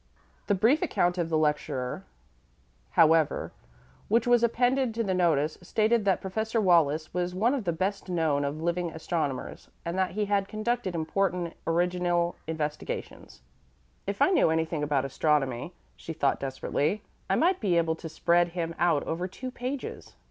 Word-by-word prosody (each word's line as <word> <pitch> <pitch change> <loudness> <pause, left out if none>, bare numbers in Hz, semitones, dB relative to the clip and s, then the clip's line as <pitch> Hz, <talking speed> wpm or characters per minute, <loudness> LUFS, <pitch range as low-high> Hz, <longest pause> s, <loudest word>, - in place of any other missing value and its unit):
The 205 - +3
brief 235 +11 +3
account 175 +1 +1
of 165 -1 -1
the 160 - +2
lecturer, 150 +1 -1 0.8
however, 160 -3 +3 0.6
which 230 +1 +2
was 245 -1 +4
appended 245 +1 +2
to 230 - 0
the 190 -3 0
notice, 160 -4 +1
stated 215 +4 +1
that 195 -2 +2
Professor 220 +4 -1
Wallis 160 -5 +3
was 180 0 -2
one 225 +7 +2
of 260 -7 -2
the 170 - +1
best 190 +4 -2
known 160 -5 +1
of 145 +3 -3
living 170 0 0
astronomers, 160 -4 -4 0.2
and 170 +1 -2
that 185 -1 0
he 210 - +1
had 200 -1 +1
conducted 215 -3 -2
important 175 +1 -1
original 175 0 +1
investigations. 160 - -5 0.6
"If - - +1
I - - +4
knew 360 - +4
anything 160 -1 0
about 145 -2 +1
astronomy," 135 0 0 0.2
she 165 - -7
thought 140 -3 +1
desperately, 140 +7 -1 0.3
"I - - +3
might 365 +2 +2
be 180 -5 +1
able 165 -1 +2
to 165 - -7
spread 170 +2 +2
him 170 -1 -3
out 165 -4 +3
over 175 +3 -3
two 255 +7 -7
pages." 255 +2 -6
175 Hz, 160 wpm, -28 LUFS, 160-205 Hz, 0.8 s, was